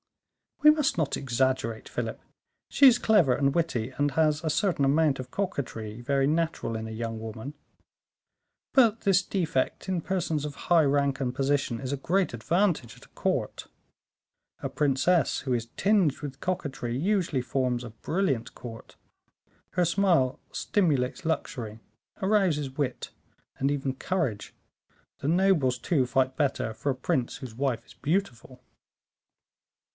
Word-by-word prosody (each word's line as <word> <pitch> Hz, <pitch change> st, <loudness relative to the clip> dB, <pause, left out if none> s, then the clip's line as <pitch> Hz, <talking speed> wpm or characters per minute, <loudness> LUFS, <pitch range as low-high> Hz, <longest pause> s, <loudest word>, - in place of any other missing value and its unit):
"We 300 Hz, -, +10 dB
must 300 Hz, -, +1 dB
not 160 Hz, -4 st, 0 dB
exaggerate, 130 Hz, -3 st, -1 dB
Philip; -, -, -4 dB, 0.5 s
she 280 Hz, -, +6 dB
is 245 Hz, -2 st, +7 dB
clever 190 Hz, -, +4 dB
and 140 Hz, -1 st, +1 dB
witty, 135 Hz, -8 st, -1 dB
and 145 Hz, 0 st, +1 dB
has 155 Hz, +1 st, +2 dB
a 160 Hz, -, 0 dB
certain 170 Hz, -3 st, +1 dB
amount 145 Hz, 0 st, +3 dB
of 130 Hz, -, -6 dB
coquetry 120 Hz, -, -4 dB
very 135 Hz, +2 st, +1 dB
natural 160 Hz, -6 st, -1 dB
in 110 Hz, 0 st, -4 dB
a -, -, -7 dB
young 115 Hz, 0 st, -4 dB
woman; 110 Hz, +5 st, -7 dB, 1.2 s
but 230 Hz, -5 st, +4 dB
this 195 Hz, -1 st, +4 dB
defect 170 Hz, -7 st, -1 dB
in 180 Hz, -3 st, 0 dB
persons 165 Hz, -4 st, -1 dB
of 145 Hz, -1 st, -6 dB
high 170 Hz, -2 st, +6 dB
rank 140 Hz, -1 st, +1 dB
and 130 Hz, -2 st, -2 dB
position, 135 Hz, -3 st, 0 dB
is 130 Hz, -1 st, -4 dB
a 140 Hz, -, -1 dB
great 180 Hz, +5 st, 0 dB
advantage 155 Hz, -, 0 dB
at -, -, -16 dB
a -, -, -25 dB
court. -, -, -2 dB, 0.9 s
A -, -, -3 dB
princess 150 Hz, +3 st, +2 dB
who 130 Hz, -2 st, -1 dB
is 115 Hz, -1 st, -2 dB
tinged 195 Hz, -8 st, +3 dB
with 140 Hz, -2 st, -6 dB
coquetry 140 Hz, -9 st, -3 dB
usually 175 Hz, -4 st, +1 dB
forms 125 Hz, 0 st, -1 dB
a 120 Hz, -, -7 dB
brilliant 135 Hz, -, -2 dB
court; 115 Hz, -2 st, -10 dB, 0.8 s
her 180 Hz, 0 st, +2 dB
smile 165 Hz, -7 st, +2 dB
stimulates 160 Hz, -4 st, 0 dB
luxury, 115 Hz, -8 st, -3 dB, 0.4 s
arouses 190 Hz, -9 st, +2 dB
wit, 135 Hz, -4 st, -3 dB, 0.5 s
and 135 Hz, -, +1 dB
even 135 Hz, -2 st, -1 dB
courage; 135 Hz, -, -2 dB, 0.7 s
the -, -, -3 dB
nobles, 165 Hz, -7 st, +3 dB
too, 130 Hz, 0 st, +1 dB
fight 130 Hz, +1 st, +1 dB
better 135 Hz, -6 st, 0 dB
for 110 Hz, +6 st, -3 dB
a -, -, -3 dB
prince 130 Hz, -1 st, -1 dB
whose 130 Hz, -4 st, -8 dB
wife 125 Hz, -3 st, -1 dB
is -, -, -16 dB
beautiful." 140 Hz, -7 st, -3 dB
140 Hz, 145 wpm, -27 LUFS, 125-175 Hz, 1.2 s, We